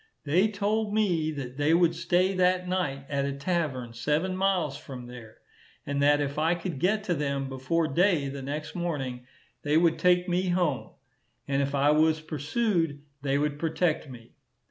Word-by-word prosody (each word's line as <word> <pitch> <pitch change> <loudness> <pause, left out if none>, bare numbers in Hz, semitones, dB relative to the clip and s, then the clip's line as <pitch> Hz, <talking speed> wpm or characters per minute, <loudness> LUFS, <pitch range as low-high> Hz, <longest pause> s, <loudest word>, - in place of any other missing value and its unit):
They 175 +8 +3
told 210 +1 -1
me 175 -8 +1
that 135 -3 -6
they 150 +3 +3
would 170 -1 +4
stay 180 +3 +1
that 180 0 +2
night 145 -7 -2
at 140 -1 -1
a 140 - -2
tavern 140 -5 -2
seven 155 +10 0
miles 185 -7 +1
from 130 -3 -9
there, 120 -3 -11 0.5
and 140 0 -1
that 145 +1 +4
if 145 0 -2
I 165 +3 +2
could 170 -4 -5
get 210 +6 +1
to 180 - 0
them 140 -3 -2
before 135 +5 -1
day 165 0 +2
the 135 0 -6
next 150 +3 -5
morning, 135 -8 -4 0.3
they 150 +3 +2
would 165 -1 +3
take 180 0 +3
me 180 +1 0
home; 175 -7 0 0.6
and 140 0 +1
if 140 0 -1
I 140 +1 +4
was 155 +1 +3
pursued, 160 - -1 0.2
they 140 0 +1
would 145 0 -1
protect 165 -1 0
me. 115 -3 -12
155 Hz, 175 wpm, -27 LUFS, 140-180 Hz, 0.6 s, would